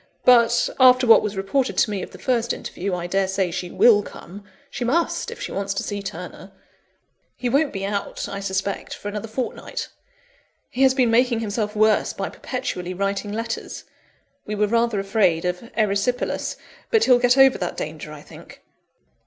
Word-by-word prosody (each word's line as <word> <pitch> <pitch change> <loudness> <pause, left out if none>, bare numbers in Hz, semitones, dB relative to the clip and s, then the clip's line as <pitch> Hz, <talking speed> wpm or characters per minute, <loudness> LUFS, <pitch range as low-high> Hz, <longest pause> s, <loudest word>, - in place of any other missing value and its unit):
But, 240 -1 +5
after 255 0 +6
what 230 - +7
was 205 -1 -4
reported 245 +7 -1
to 215 - +3
me 200 -2 -2
of - - -6
the - - -13
first 240 -2 0
interview, 185 +1 -4
I 175 -1 -4
daresay 190 0 0
she 180 +1 -4
will 210 +1 +5
come. 200 0 -11 0.3
She - - -4
must, 310 +8 0
if - - -9
she - - -5
wants 200 0 -3
to - - -2
see 205 -1 -4
Turner; 185 0 -8 0.8
he 250 - -2
won't 280 +4 +2
be 195 0 -4
out, 200 0 -3
I 200 - -5
suspect, 195 0 -3
for 205 - -6
another 210 +2 -5
fortnight. 240 +3 -5 0.8
He 255 - -3
has 265 -1 +5
been 250 -4 +3
making 240 0 +3
himself 210 0 -3
worse 215 0 +3
by - - -4
perpetually 180 0 -5
writing 200 +2 -2
letters; 225 +2 -5 0.6
we 210 - -3
were 210 0 +2
rather 230 0 +1
afraid 195 -4 +1
of 180 +6 -3
erysipelas, 215 +3 0 0.3
but 450 -2 +3
he'll 250 -2 +5
get 245 +1 +3
over 270 -1 +6
that - - -3
danger, - - -6
I - - -10
think." - - -14
210 Hz, 175 wpm, -22 LUFS, 195-245 Hz, 0.8 s, what